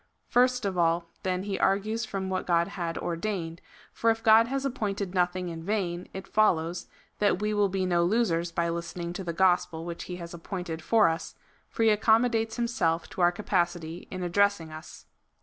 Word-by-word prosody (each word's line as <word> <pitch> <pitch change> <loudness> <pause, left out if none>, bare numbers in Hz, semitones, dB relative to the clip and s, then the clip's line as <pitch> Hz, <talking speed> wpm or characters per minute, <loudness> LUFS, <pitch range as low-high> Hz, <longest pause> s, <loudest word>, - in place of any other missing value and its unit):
First 250 -1 +3
of 190 -3 -1
all 170 0 +1
then 185 0 -1
he 200 -1 -3
argues 215 +4 +1
from 195 -1 -4
what 190 0 -2
Grod 170 +1 +2
had 175 -4 -4
ordained, 170 -1 -3 0.3
for 230 - +1
if 225 0 0
God 225 +1 +6
has 275 +2 -2
appointed 200 -7 -2
nothing 180 0 0
in 165 -1 -6
vain, 180 -3 -2
it 190 0 -8
follows, 175 -5 +1 0.3
that 205 -3 +2
we 210 +1 -1
will 205 -1 +2
be 190 0 -1
no 175 -1 +2
losers 175 -4 +1
by 170 0 0
listening 170 +1 -4
to 190 - -5
the 170 - -3
gospel 175 -2 +1
which 170 0 -6
he 180 - -6
has 170 -1 -8
appointed 170 -1 -5
for 220 +1 +4
us, 165 0 -3 0.3
for 225 - -1
he 225 - +6
accommodates 225 +1 +3
himself 230 -9 0
to 185 - -4
our 175 0 +5
capacity 175 -3 -2
in 185 -1 -5
addressing 180 -2 +1
us. 155 0 -11
185 Hz, 185 wpm, -28 LUFS, 170-210 Hz, 0.3 s, God